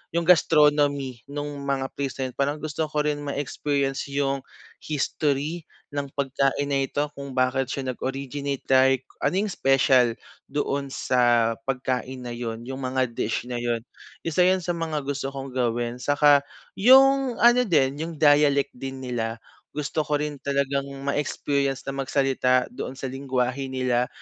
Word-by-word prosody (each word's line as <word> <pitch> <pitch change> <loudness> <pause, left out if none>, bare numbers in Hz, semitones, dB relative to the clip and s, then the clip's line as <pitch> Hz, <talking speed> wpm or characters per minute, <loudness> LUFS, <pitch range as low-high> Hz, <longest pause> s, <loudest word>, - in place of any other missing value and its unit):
Yung 170 - +2
gastronomy 145 -6 +3
nung 145 0 -5
mga 135 -1 -1
present. 135 -2 -3
Parang 145 +2 +1
gusto 155 +1 -3
ko 150 0 -1
rin 150 -1 -1
ma-experience 140 -1 -2
yung 140 -1 0 0.4
history 150 +2 -2 0.2
ng 145 -1 -3
pagkain 140 0 0
na 135 - +2
ito 145 0 -2
kung 140 -2 -8
bakit 130 0 +1
siya 130 -2 -2
nag - - -12
originate 140 +1 -3
like 130 0 +4 0.2
ano 145 +6 0
yung 210 - -2
special 130 -5 +3 0.3
doon 140 -1 -2
sa 120 -3 +2
pagkain 130 0 -2
na 120 - -5
yun, 115 -1 -5
yung 130 +2 -6
mga 130 -1 -1
dish 115 0 -2
na 120 -1 -4
yun. 120 -1 -1 0.4
Isa 165 +1 -2
yun 185 -1 +2
sa 175 - -1
mga 160 -4 -3
gusto 140 -1 -2
kong 135 0 -6
gawin. 120 -1 -1
Saka 145 +1 +4 0.4
yung 265 +2 +6
ano 240 +1 +6
din 140 -4 +2
yung 165 +1 -4
dialect 145 -2 +4
din 135 +1 -7
nila, 115 -2 -2 0.4
gusto 150 +1 -2
ko 150 - +1
rin 145 -1 -3
talagang 140 0 -1 0.2
ma-experience 140 -1 -1
na 135 - -4
magsalita 135 - +1
doon 135 - -6
sa 130 -1 -5
lenggwahe 130 0 -2
nila, 125 -1 0
140 Hz, 150 wpm, -25 LUFS, 130-145 Hz, 0.4 s, yung